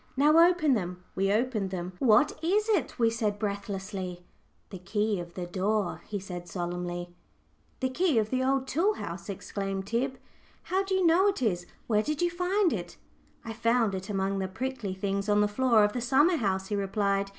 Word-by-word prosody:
"Now 300 +4 +5
open 315 -6 +2
them;" 180 -5 -3
we 195 +1 +1
opened 215 -3 0
them. 180 -1 -5
"What 245 +3 +5
is 415 +6 +2
it?" 390 - +1
we 230 -1 +3
said, 215 -3 -1
breathlessly. 195 -3 -4 0.5
"The 190 - -7
key 205 +2 -1
of 170 0 -8
the 180 - -4
door!" 195 +2 -1
he 205 -1 -3
said, 180 -2 -7
solemnly. 175 0 -4 0.7
"The 260 - +1
key 315 0 +1
of 215 -1 +1
the 260 +1 +1
tool 345 +11 +1
house!" 170 +3 -7
exclaimed 195 0 -4
Tib. 255 +5 -1 0.5
"How 380 +2 0
do 385 -1 -1
you 375 -1 +2
know 345 +4 +5
it 390 -10 0
is 175 -6 0
it? - - -27 0.2
Where 215 -2 +2
did 300 +5 -3
you 350 - +2
find 360 +1 +1
it?" - - -5 0.5
"I 225 - -5
found 230 -1 +2
it 190 +1 -5
among 195 -1 -1
the 190 - -1
prickly 210 -1 -4
things 200 +1 -2
on 205 0 +4
the 210 - +4
floor 230 0 +3
of 210 0 +2
the 245 - -2
summer 290 +8 +4
house," 190 -5 -1
he 210 - 0
replied. 200 0 0
210 Hz, 195 wpm, -28 LUFS, 190-260 Hz, 0.7 s, Now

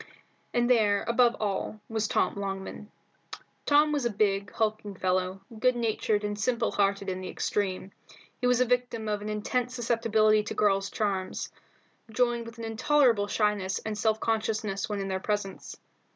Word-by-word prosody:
And 240 0 +2
there, 210 -5 +3
above 235 0 +4
all, 210 +1 -2
was 220 -1 -1
Tom - - +1
Longman. 195 +1 -5 0.8
Tom 295 +1 +5
was 290 -3 0
a 240 - +1
big, 200 -1 0
hulking 215 -2 -2
fellow, 185 +1 -1 0.2
good 255 +1 +3
natured 220 -2 0
and 205 0 -3
simple 235 +2 +1
hearted 200 0 +1
in 185 0 -3
the 185 - -5
extreme. 195 -1 -2 0.5
He 250 - +1
was 250 0 +4
the 255 - +3
victim 245 -2 -1
of 210 -1 -1
an 210 - -5
intense 245 +4 -1
susceptibility 225 -3 +3
to 210 - -6
the - - -21
girls' 195 -1 +2
charms, 195 -3 -2 0.6
joined 235 0 0
with 230 +1 -11
an 230 - -7
intolerable 230 -1 +3
shyness 205 -3 0
and 220 -1 -2
self 220 +1 +1
consciousness 215 -3 -1
when 205 -1 -2
in 195 - -3
their 190 -1 -1
presence. 205 -1 -3
215 Hz, 165 wpm, -28 LUFS, 200-235 Hz, 0.8 s, Tom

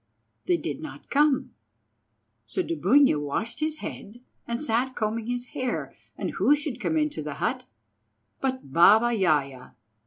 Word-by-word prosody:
They 355 -1 +3
did 295 - -5
not 310 - -10
come, 290 -1 +2 0.9
so 370 - -1
Dubunia 280 - +3
washed 150 - -3
his 310 0 -2
head 215 +4 -8 0.3
and 235 0 -2
sat 255 -1 -1
combing 220 +1 -2
his 245 0 -3
hair, 255 -2 -3 0.2
and - - -3
who 290 - +4
should 290 -5 -5
come 320 - 0
into 300 - 0
the 150 -1 -5
hut 250 - -2 0.7
but 260 - -3
Baba 215 +8 +6
Yaja. 140 - 0
245 Hz, 145 wpm, -26 LUFS, 205-290 Hz, 0.9 s, Baba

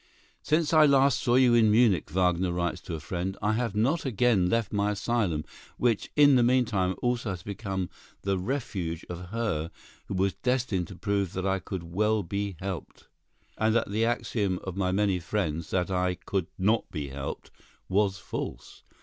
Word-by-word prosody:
"Since 155 +1 +1
I 155 -1 +7
last 140 -1 +4
saw 120 - +2
you 125 -2 +5
in 115 -2 +5
Munich," 105 -8 +3
Wagner 90 +1 +1
writes 85 0 -2
to 85 - -5
a - - -5
friend, 90 +4 -4
"I 105 +1 +1
have 115 -2 -1
not 135 +10 +1
again 115 -7 +2
left 115 0 0
my 100 0 +1
asylum, 100 -6 0 0.3
which 120 -4 +1
in 145 -3 +6
the - - +4
meanwhile 115 -7 +2
also 120 -2 0
has 90 -3 -5
become 95 -2 -3 0.4
the 95 -1 0
refuge 95 - -3
of 90 +1 -6
her 100 -8 -2 0.4
who 100 - -4
was 95 +1 +1
destined 120 -9 -1
to 95 - -10
prove 100 -2 -1
that 95 0 -3
I 95 0 +1
could 90 +1 -6
well 105 +5 +1
be 100 +2 -3
helped, 95 -3 -6 0.5
and 110 +1 +2
that 115 -4 +1
the 110 +2 +1
axiom 105 -5 0
of 95 -2 -5
my 95 -2 0
many 100 -1 +1
friends, 85 -3 -2
that 90 0 0
'I 90 0 +1
could 95 -1 -3
not 105 +4 +1
be 75 -3 -5
helped,' 70 +1 -6 0.4
was 100 0 +1
false! 90 - -6
100 Hz, 180 wpm, -28 LUFS, 90-115 Hz, 0.5 s, I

